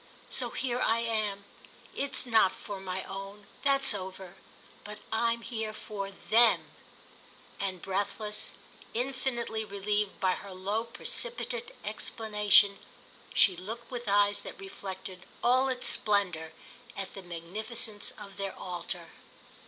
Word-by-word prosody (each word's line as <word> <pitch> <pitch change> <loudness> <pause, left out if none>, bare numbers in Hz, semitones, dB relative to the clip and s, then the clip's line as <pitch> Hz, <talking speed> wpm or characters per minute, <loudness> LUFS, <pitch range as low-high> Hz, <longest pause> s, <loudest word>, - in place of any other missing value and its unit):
So - - +3
here 250 -2 -1
I 225 - +4
am. 215 -4 -1 0.5
It's 280 -1 0
not 220 -6 +4
for 200 -2 -6
my 190 0 -3
own—that's 210 +8 +1
over. 190 -2 -6 0.5
But 210 0 -8
I'm 230 +1 +2
here 220 -2 -3
for 205 -2 -5
them." 225 +4 +3 0.9
And 190 -3 -3
breathless, 205 +2 -2 0.4
infinitely 245 -3 -1
relieved 205 0 -1
by 190 -1 +3
her 190 +1 -5
low 205 +5 -1
precipitate 485 - -2
explanation, 210 -2 +4 0.6
she 190 - +7
looked 225 +7 -7
with 240 -3 -4
eyes 205 0 +4
that - - -9
reflected 190 -1 -7 0.2
all 255 +2 +5
its 255 -1 +1
splendour 180 -7 +2 0.5
at 195 -1 -5
the 195 - -7
magnificence 205 +5 -2
of 200 -2 -10
their 195 -1 -4
altar. 175 -1 -4
205 Hz, 120 wpm, -30 LUFS, 195-230 Hz, 0.9 s, she